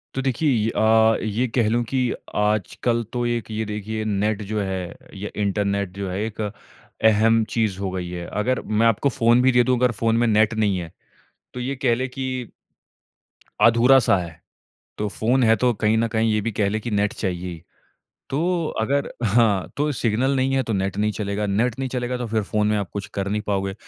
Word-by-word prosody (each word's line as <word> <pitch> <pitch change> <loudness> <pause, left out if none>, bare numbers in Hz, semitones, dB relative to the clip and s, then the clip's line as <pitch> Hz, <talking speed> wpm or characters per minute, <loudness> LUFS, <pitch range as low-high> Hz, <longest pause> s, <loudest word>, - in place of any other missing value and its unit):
तो 135 - -1
देखिए 135 +3 0
ये 110 -3 +1
अ, 110 0 +4
ये 110 +4 0
कह 115 -4 +3
लूँ 120 +2 +1
कि 130 -2 0 0.2
आजकल 105 +3 0
तो 120 -1 -1
एक 120 -2 -2
ये 110 0 -2
देखिए 110 +1 -4
नेट 105 +1 0
जो 110 - 0
है 95 -3 -4 0.2
या 100 +2 -5
इंटरनेट 100 -1 0
जो 100 -1 -3
है 90 +2 -3
एक 110 0 -6
अहम 110 +1 +1
चीज़ 110 -5 0
हो 95 -1 -2
गयी 90 -1 -4
है। 85 -1 -5
अगर 120 +5 -1 0.2
मैं 115 - +5
आपको 115 +5 +2
फ़ोन 120 -1 +3
भी 130 +1 +4
दे 125 -1 +4
दूँ 125 0 +2
अगर 125 0 +2
फ़ोन 115 0 +2
में 120 - +2
नेट 110 0 +3
नहीं 105 -3 +1
है 85 -2 -6 0.6
तो 125 - -5
ये 135 +3 -3
कह 125 -2 +2
ले 130 +2 -2
कि 130 +1 -6 1.4
अधूरा 120 +3 +6
सा 100 -4 +3
है, 85 -2 -6 0.6
तो 105 - -1
फ़ोन 120 +5 +1
है 115 0 +5
तो 125 -1 +3
कहीं 110 +1 +1
न 115 +1 +2
कहीं 110 0 +1
ये 105 - +1
भी 115 +3 -2
कह 100 -1 0
ले 110 +2 -1
कि 120 +2 -5
नेट 105 0 +1
चाहिए 90 -2 -3
ही। 85 -2 -8 0.7
तो 170 +4 0
अगर 140 +5 0 0.2
हाँ 105 -3 +2
तो 150 +2 0
सिग्नल 125 +3 0
नहीं 130 +1 +1
है 135 - +2
तो 115 - -3
नेट 95 -1 -1
नहीं 105 +1 +1
चलेगा, 105 0 -2
नेट 110 +5 0
नहीं 135 -1 -2
चलेगा 125 0 -2
तो 120 - -3
फिर 110 -1 0
फ़ोन 105 +1 0
में 105 - +2
आप 100 -3 -2
कुछ 100 -1 -4
कर 100 0 -2
नहीं 105 +1 -1
पाओगे, 95 -1 -1
110 Hz, 215 wpm, -23 LUFS, 100-120 Hz, 1.4 s, अधूरा